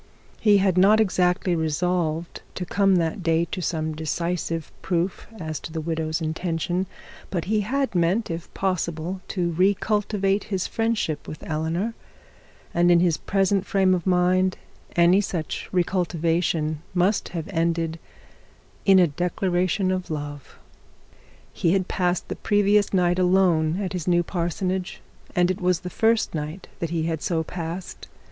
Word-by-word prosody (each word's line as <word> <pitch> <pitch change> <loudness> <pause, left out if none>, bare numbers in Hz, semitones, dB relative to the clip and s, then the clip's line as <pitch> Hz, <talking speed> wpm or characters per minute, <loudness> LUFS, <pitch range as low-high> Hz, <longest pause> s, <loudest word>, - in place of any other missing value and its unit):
He 210 -2 +5
had 190 -2 +2
not 205 +4 +6
exactly 180 -3 +2
resolved 165 +1 -1
to 180 - -3
come 195 +1 +3
that 170 +3 0
day 165 0 +2
to 185 - -3
some 160 -2 -2
decisive 165 +1 -2
proof 175 +1 -1
as 155 -2 -4
to - - -8
the 160 - -3
widow's 160 0 -2
intention; 170 +3 -1 0.4
but 175 -4 -2
he 215 +2 +1
had 265 +6 -1
meant, 180 +4 +1
if 165 +1 -6
possible, 180 -1 -2
to 175 -2 -1
re 185 +5 +3
cultivate 205 -1 0
his 190 -3 -2
friendship 225 -10 -1
with 155 - -8
Eleanor; 165 +8 -1 0.8
and 175 +1 +3
in 175 -1 +6
his 170 -2 +2
present 195 -1 +1
frame 190 -2 +2
of 180 0 -1
mind 185 +1 +3 0.4
any 175 +3 +5
such 175 -6 -4
re 180 -2 +3
cultivation 165 -3 0
must 185 +4 +2
have 160 - -4
ended 165 -2 0 0.9
in 195 -1 +7
a 180 - +7
declaration 180 +3 0
of 185 -1 -2
love. 145 -2 -6 1.0
He 170 - +1
had 190 -1 +1
passed 180 -1 0
the - - -4
previous 205 0 +2
night 180 -1 +2
alone 180 -3 +3
at 195 -2 -3
his 180 -3 -4
new 175 -1 +3
parsonage, 180 +2 -2 0.4
and 180 +1 +3
it 185 - -5
was 180 -1 +1
the 180 - -6
first 225 0 +2
night 155 +4 -5
that 170 - -2
he 165 -1 -1
had 160 -1 -2
so 165 -2 0
passed. 170 +2 -6
180 Hz, 155 wpm, -24 LUFS, 165-190 Hz, 1.0 s, in